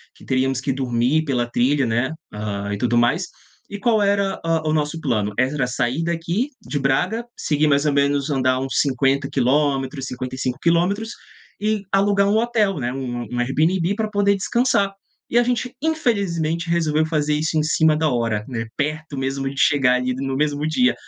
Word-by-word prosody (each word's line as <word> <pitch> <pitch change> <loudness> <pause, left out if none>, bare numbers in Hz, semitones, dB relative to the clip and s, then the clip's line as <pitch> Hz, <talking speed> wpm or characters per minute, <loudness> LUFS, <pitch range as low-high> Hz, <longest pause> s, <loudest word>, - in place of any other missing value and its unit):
que - - -18
teríamos 130 0 0
que 135 - -1
dormir 130 +3 +1
pela 125 -4 0
trilha, 130 +4 +1
né, 120 +4 0 0.2
ah, 100 -1 -4
e - - -2
tudo 120 +2 +1
mais. 150 +10 +2 0.4
E 205 - -5
qual 220 0 +2
era, 200 -1 +1
ah, 165 -1 +1
o 155 - +1
nosso 155 +1 -1
plano? 105 -8 -1
Era 130 +1 +1
sair 125 +5 -1
daqui 170 - -1
de 145 - -3
Braga, 180 - 0
seguir 150 0 +1
mais 140 0 +2
ou 150 - +3
menos 140 0 +1
andar 130 -2 +1
uns 135 0 -1
50 135 0 +1
quilômetros, 135 +1 0
55 130 0 -4
quilômetros 180 +6 +1 0.5
e 215 -1 0
alugar 200 0 +3
um 205 +2 +3
hotel, 220 -5 +1
né, 120 -1 -2
um 125 -2 -4
um 125 - -2
Airbnb 165 +9 +1
para 215 0 -2
poder 200 -1 +2
descansar. 200 0 +1 0.4
E 235 - +1
a - - +4
gente 250 0 -1
infelizmente 195 - 0
resolveu 160 -2 +1
fazer 150 -2 0
isso 160 +1 -1
em 155 - +2
cima 155 0 +3
da 155 0 +1
hora, 115 -4 -1
né, 115 -3 -3
perto 155 +1 -3
mesmo 135 +1 -2
de 140 - -9
chegar 135 -4 +4
ali 125 0 -1
no 135 0 -3
mesmo 150 +1 0
dia, 250 +11 +3
150 Hz, 180 wpm, -21 LUFS, 130-180 Hz, 0.5 s, a